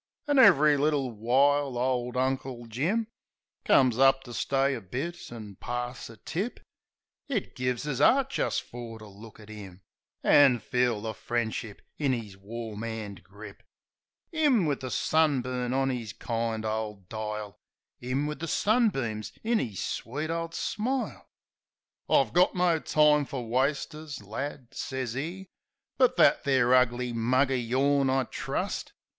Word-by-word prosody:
An' 290 -2 +3
ev'ry 155 - +7
little 140 -3 +1
while 135 +4 +2
ole 125 0 -1
Uncle 130 -2 -2
Jim 160 - -1 0.6
Comes 130 -3 +4
up 135 0 +5
to 120 - -10
stay 135 +3 +1
a 120 - -5
bit 170 - -5
an' 105 -5 -9
pass 120 0 -5
a 115 - -12
tip. 185 - -4 0.7
It 245 -9 -3
gives 125 +2 -2
us 135 -3 -2
'eart 270 - +4
jist - - -1
fer 120 -2 -8
to 110 - -12
look 105 +2 -13
at 105 0 -12
'im, 100 -3 -10 0.4
An' 140 -4 +6
feel 120 -1 0
the 110 0 -4
friendship 115 -3 -3 0.2
in 140 -4 +2
'is 105 -5 -7
warm 110 +2 -7
'and 110 -4 -6
grip. 105 +1 -12 0.7
'Im, 290 - +3
wiv 145 -3 0
the 130 - -5
sunburn 130 -5 +1
on 135 +1 +1
'is 115 -6 -5
kind 115 -1 -3
ole 110 -3 -3
dile; 105 -1 -5 0.4
'Im, 130 +4 -1
wiv 150 0 -4
the 165 - -4
sunbeams 145 - +1
in 230 0 +2
'is 105 -7 -4
sweet 150 +8 -4
ole 165 0 -2
smile. 235 +8 -3 0.8
"I 135 - +4
got 180 +1 +4
no 175 -2 +2
time 150 -1 +3
fer 135 -1 -5
wasters, 140 +4 -2
lad," 130 +4 -6
sez 130 -4 -4
'e, 170 +8 -4 0.5
"But 255 -1 +4
that - - +5
there 130 -3 +3
ugly 125 -1 +2
mug 130 +4 +2
o' - - +2
yourn 135 +3 +2
I 130 0 +2
trust." - - -4
130 Hz, 150 wpm, -28 LUFS, 115-150 Hz, 0.8 s, ev'ry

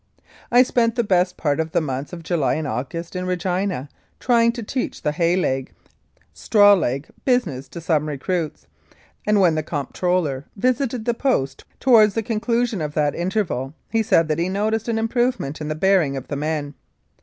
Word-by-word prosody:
I 245 +1 +7
spent 235 -2 +1
the 235 - +1
best 180 -3 +1
part 145 -1 0
of 160 0 -2
the - - +3
months 135 -2 -4
of 170 -2 -8
July 165 -4 0
and 155 -1 -3
August 165 +8 -4
in 180 0 -3
Regina 180 -4 -1 0.3
trying 235 -2 +3
to 235 -1 -6
teach 255 +4 -4
the 150 - +1
"hay 170 +3 +1
leg 135 -8 -1 0.2
" - - -43
" 75 - -36
straw 205 - +5
leg 140 -6 0
" - - -32
business 140 - -5
to - - -8
some 155 -2 0
recruits, 155 +3 -3 0.6
and 210 -1 +4
when 180 -4 +4
the 155 - 0
Comp 145 -3 -5
troller 170 -7 0
visited 250 +1 0
the 240 - +2
Post 230 - -1
towards 220 -6 +5
the 225 - 0
conclusion 230 -2 -1
of 150 -1 -4
that 145 -1 +1
interval, 175 - -2 0.2
he 225 - +2
said 165 -6 +3
that 155 0 -1
he 175 +2 0
noticed 215 +3 -1
an 230 -1 0
improvement 225 - -1
in 150 - -4
the 155 - -2
bearing 170 -5 +2
of 135 - -8
the 145 - -2
men. 150 0 -2
180 Hz, 195 wpm, -22 LUFS, 150-220 Hz, 0.6 s, I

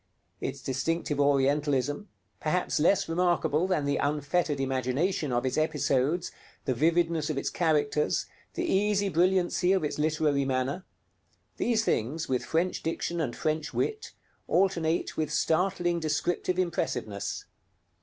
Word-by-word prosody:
Its - - -5
distinctive 145 +3 -1
Orientalism, 145 - +1 0.3
perhaps 170 +2 0
less 190 +5 +3
remarkable 175 -1 +1
than 180 -6 0
the 140 0 +1
unfettered 145 +1 0
imagination 135 +5 0
of 120 +1 0
its 130 - 0
episodes, 150 +1 +1 0.3
the 130 - +1
vividness 165 +2 +1
of 155 - -2
its - - -1
characters, 150 -3 +1 0.3
the 350 - -1
easy 205 - +2
brilliancy 180 +1 +2
of 190 - +1
its 150 - -2
literary 150 -2 +1
manner 135 +6 -1 0.7
these 225 -2 +1
things, 145 +9 -1
with 125 -1 0
French 170 +3 0
diction 165 +1 -2
and 125 -6 -2
French 155 0 -2
wit, 435 0 -2 0.3
alternate 170 -3 +1
with 155 - -1
startling 175 0 +1
descriptive 170 +3 -1
impressiveness. 125 - -2
155 Hz, 125 wpm, -28 LUFS, 140-175 Hz, 0.7 s, less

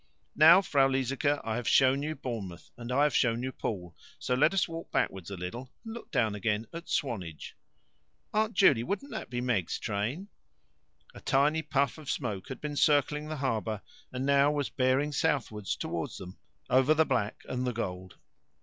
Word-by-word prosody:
Now, 165 +5 +8
Frau 140 -6 +3
Liesecke, 135 +2 0
I 110 0 -2
have 120 - -4
shown 135 +1 +4
you 155 +2 -3
Bournemouth, 100 - -6
and 120 0 -7
I 140 +3 +3
have 150 -4 +2
shown 115 0 +2
you 130 - -2
Poole, 90 -8 -5 0.2
so 125 - -2
let 130 +7 +4
us 195 -1 +1
walk 165 0 -7
backward 95 -2 -1
a 100 - -6
little, 120 +9 -6
and 225 - -6
look 235 - -9
down 120 -7 +1
again 105 +2 -1
at 170 +1 -8
Swanage." 95 - -3 0.8
"Aunt 215 +1 +1
Juley, 140 - +5
wouldn't 205 - -4
that - - -6
be 120 0 -3
Meg's 115 -9 0
train?" 115 - -3 0.8
A - - -12
tiny 150 +4 +2
puff 140 -2 0
of 150 - -9
smoke 105 -8 -3
had 130 - -6
been 150 -1 -4
circling 150 +1 +2
the 155 - -4
harbour, 110 -5 -2 0.3
and 130 +1 -3
now 140 +1 +4
was 145 -2 -1
bearing 130 +3 +1
southwards 130 -9 -1
towards - - -4
them 90 0 -10 0.3
over 130 +4 +4
the 160 +1 +4
black 115 -7 -1
and 125 0 -2
the - - +1
gold. 95 -5 -5
130 Hz, 185 wpm, -29 LUFS, 110-150 Hz, 0.8 s, Now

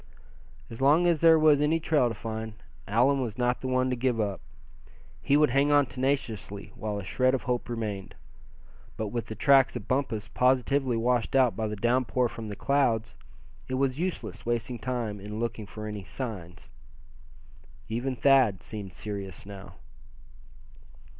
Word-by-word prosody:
As 115 - -8
long 150 +6 +5
as 170 -3 +2
there 165 -1 +7
was 155 -2 +5
any 155 +2 +2
trail 150 -6 +2
to 115 - -5
find, 110 0 -5 0.3
Allan 130 +6 +3
was 120 -3 -4
not 125 0 0
the 130 - -3
one 130 0 +1
to - - +1
give 125 -1 0
up; 100 -5 -2 0.8
he 140 - +3
would 150 -3 +4
hang 140 +3 +3
on 145 -1 +5
tenaciously 120 -7 -3
while 105 -1 -4
a 100 - -5
shred 130 +7 +1
of 130 - -4
hope 125 -2 -2
remained. 105 -4 -4 0.8
But 110 -1 -3
with 120 +1 -4
the 110 - -6
tracks 135 +3 +4
of 110 -4 -6
Bumpus 125 -5 -1
positively 130 0 +2
washed 120 +2 0
out 130 -3 +4
by 110 -1 -2
the 105 - -4
downpour 125 +3 +1
from 110 -1 -7
the 100 - -5
clouds, 115 - +1 0.5
it 130 - -2
was 135 +1 0
useless 180 0 -4
wasting 120 0 -2
time 115 -4 -3
in 105 +2 -6
looking 115 -2 -3
for 105 +1 -8
any 105 -2 -5
"signs." 95 - -6 1.2
Even 120 +4 -2
Thad 125 -6 +4
seemed 100 -4 -7
serious 100 -4 -6
now. 100 -3 -10
120 Hz, 165 wpm, -28 LUFS, 105-135 Hz, 1.2 s, there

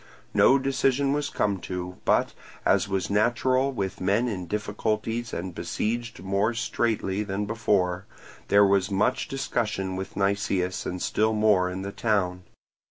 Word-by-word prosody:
No 135 - +6
decision 135 0 +1
was 145 0 -1
come 100 -2 0
to, 90 0 -5
but, - - +2 0.3
as 100 0 +3
was 95 -2 -1
natural 125 +5 +2
with 95 -8 -4
men 100 +6 +2
in 90 -6 -4
difficulties 110 +3 -2
and 90 +1 -4
besieged 115 +2 -3
more 100 +4 +1
straitly 110 -3 -1
than 105 0 -2
before, 100 -4 0 0.4
there 100 0 +6
was 100 -1 +2
much 105 +6 +1
discussion 105 -8 -2
with 95 +1 -6
Nicias 100 -2 0
and 90 - -4
still 110 +4 +1
more 105 -4 +3
in 95 +1 -5
the 100 - -4
town. 100 -5 0
100 Hz, 145 wpm, -26 LUFS, 95-115 Hz, 0.4 s, No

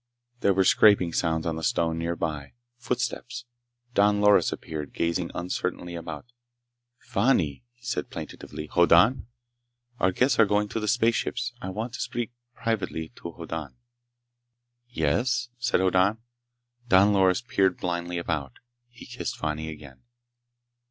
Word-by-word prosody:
There 100 -4 +2
were 95 - +4
scraping 95 -4 +5
sounds 80 -2 0
on 80 -1 -1
the 80 - -6
stone 80 +1 +1
nearby. 80 -4 -3 0.3
Footsteps. 120 0 -3 0.5
Don 105 -1 +4
Loris 105 0 +5
appeared, 75 -3 -6
gazing 85 +1 -1
uncertainly 90 0 -3
about. 80 -3 -6 0.7
"Fani!" 100 - +1
he 120 +1 -31
said 125 - -2
plaintively. 75 - -7
"Hoddan? 85 - +4 0.7
Our 95 - +3
guests 125 +6 +2
are 110 - +7
going 105 +1 +1
to 115 - -2
the 105 - -3
spaceships. 120 +1 +1
I 95 - -4
want 110 +5 -4
to - - -5
speak 120 -1 -3 0.2
privately 100 -8 -2
to 85 - -7
Hoddan." 80 -5 -6 1.1
"Yes?" 120 - 0
said 125 -5 +1
Hoddan. 95 +3 +3 0.7
Don 100 -1 +5
Loris 95 +3 +3
peered 100 -7 +1
blindly 85 0 -3
about. 75 -6 -3 0.4
He 120 - -13
kissed - - -5
Fani 80 0 -3
again. 70 -4 -11
95 Hz, 130 wpm, -26 LUFS, 80-115 Hz, 1.1 s, are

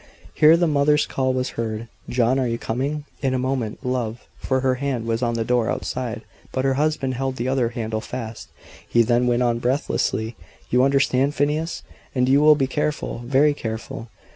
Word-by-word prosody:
Here 155 +2 +6
the 175 - +2
mother's 150 -1 +3
call 130 -1 0
was 130 0 -1
heard. 115 0 -4 0.2
"John, 125 +2 +2
are 130 - +1
you 115 0 -1
coming?" 140 +7 -3 0.2
"In 135 -2 +1
a - - +1
moment, 130 -4 -2
love," 125 -2 -2
for 130 -1 0
her 130 -1 +2
hand 130 -5 -1
was 115 0 -1
on 120 -1 0
the 115 -1 -1
door 120 -1 +1
outside; 120 -3 -3 0.3
but 130 0 -1
her 135 - +3
husband 145 -2 0
held 130 +1 -2
the 120 0 -3
other 130 -3 +1
handle 110 -2 -3
fast. 115 -2 -6 0.4
He 120 - +4
then 120 +2 +2
went 120 0 +2
on, 120 -1 +1
breathlessly, 120 -3 -1 0.4
"You 125 - +4
understand, 140 +1 +2
Phineas? 150 +4 -1 0.3
And 125 -1 +2
you 135 +2 +5
will 155 0 +7
be 135 -2 +1
careful, 150 -1 -2
very 140 +3 +4
careful? 115 -2 -6
130 Hz, 190 wpm, -23 LUFS, 115-140 Hz, 0.4 s, will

